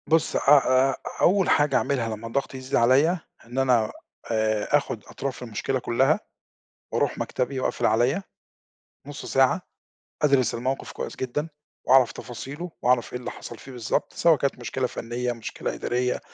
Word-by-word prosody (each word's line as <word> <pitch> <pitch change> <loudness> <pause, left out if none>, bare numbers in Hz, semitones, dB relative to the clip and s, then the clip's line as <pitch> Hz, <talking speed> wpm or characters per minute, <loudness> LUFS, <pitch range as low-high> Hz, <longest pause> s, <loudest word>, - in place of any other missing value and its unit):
بُص، 160 0 +2
أ - - +3 0.5
أ - - -4 0.3
أول 190 0 +4
حاجة 145 -2 +3
أعملها 115 -5 0
لمّا 110 +2 -8
الضغط 135 +3 -2
يزيد 130 +1 -3
عليّا، 140 +9 +4 0.3
إن 120 +2 -9
أنا 125 -5 +3 0.4
آآ 110 -1 +2
آخُد - - -4
أطراف 135 -2 -5
المشكلة 125 +3 -2
كُلّها 125 +2 +2 0.7
وأروح - - 0
مكتبي 130 +1 -2
وأقفل - - 0
عليّا 120 - +2 0.9
نُص 145 -1 -7
ساعة، 135 +7 +3 0.6
أدرس 135 -6 +3
الموقف 130 +3 -3
كويس - - -6
جدًا 145 +5 -3 0.4
وأعرف 130 -2 +6
تفاصيله 140 +8 -7
وأعرف 125 -1 +2
إيه 125 - -3
اللي 125 - -5
حصل 120 - -9
فيه 135 - -12
بالضبط، 120 -4 -2
سواء 165 -2 +4
كانت 140 -1 -1
مشكلة 125 +1 -2
فَنيّة، 120 +1 -3
مشكلة 115 -2 -5
إدارية 125 +1 -1
130 Hz, 150 wpm, -25 LUFS, 120-140 Hz, 0.9 s, وأعرف